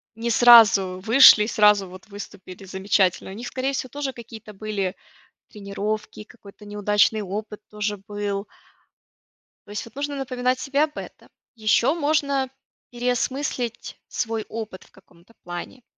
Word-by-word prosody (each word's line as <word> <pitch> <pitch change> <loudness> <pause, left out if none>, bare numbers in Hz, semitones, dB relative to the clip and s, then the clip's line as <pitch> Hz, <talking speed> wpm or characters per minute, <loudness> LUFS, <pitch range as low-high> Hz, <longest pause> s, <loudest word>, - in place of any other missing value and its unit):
не 230 +1 -3
сразу 215 -6 +6
вышли, 225 -2 +8
сразу 210 -4 +4
вот 185 +2 -13
выступили 200 -2 -10
замечательно. 190 -1 0
У - - -8
них 235 +5 -7
скорее 265 +1 -2
всего 260 -1 -3
тоже 280 0 -4
какие-то 225 -3 -11
были 200 -2 -3 0.6
тренировки, 210 +1 -5
какой-то 210 -2 -16
неудачный 210 +1 +1
опыт 210 +2 -6
тоже 210 0 -3
был. 205 -1 -3 1.2
То - - -9
есть 210 - -5
это 230 +4 -13
нужно 290 0 -3
напоминать 255 -1 -1
себе 275 +3 +1
об 300 -1 -7
этом. - - -10 0.3
Ещё 230 +5 +2
можно 285 -4 0 0.4
переосмыслить 245 0 -3
свой 225 -2 -3
опыт 220 -4 -7
в - - -24
каком-то 185 +2 -23
плане. 175 +8 -8
215 Hz, 135 wpm, -23 LUFS, 200-250 Hz, 1.2 s, вышли